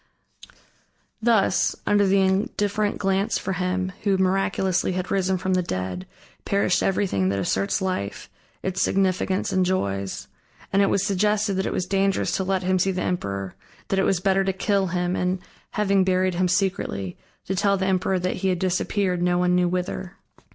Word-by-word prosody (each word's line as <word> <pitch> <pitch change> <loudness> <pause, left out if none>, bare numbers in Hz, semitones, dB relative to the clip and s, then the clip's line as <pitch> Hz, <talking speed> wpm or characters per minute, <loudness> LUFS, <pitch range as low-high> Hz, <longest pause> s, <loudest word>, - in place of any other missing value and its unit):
Thus 215 -6 +2
under 205 -1 +3
the 195 +1 +4
indifferent 205 +2 0
glance 195 +1 0
for 190 - -3
him, 185 +1 -1
who 200 -2 +2
miraculously 190 -1 +1
had 185 +1 -3
risen 190 -1 +1
from 185 +1 -1
the 185 - +2
dead, 95 - -4 0.4
perished 200 -2 +1
everything 180 - +1
that 100 - -1
asserts 100 - 0
life, 185 - -3 0.4
its 190 0 -1
significance 190 0 +1
and 185 - +3
joys. 100 - -2 0.5
And 195 - +4
it 200 - +3
was 200 - +1
suggested 210 +1 +1
that 190 0 -1
it - - -2
was 180 - -1
dangerous 195 +1 +1
to 190 - -1
let 190 0 -1
him 185 0 +1
see 195 - +2
the 185 - -2
emperor, 100 - -3 0.4
that 195 - +1
it - - +3
was 190 - +2
better 195 +1 +2
to 190 0 0
kill 195 0 +1
him 180 0 -1
and, 180 +1 0 0.4
having 200 -2 +2
buried 185 0 +1
him 180 +1 +1
secretly, 180 - -1 0.3
to 190 - -2
tell 200 +1 +2
the 190 - -1
emperor 190 0 +1
that 180 0 -2
he 190 - -1
had 185 -1 +1
disappeared 185 0 0
no 175 0 +2
one 180 0 +2
knew 180 0 +3
whither. 180 +1 -3
185 Hz, 180 wpm, -24 LUFS, 180-195 Hz, 0.5 s, the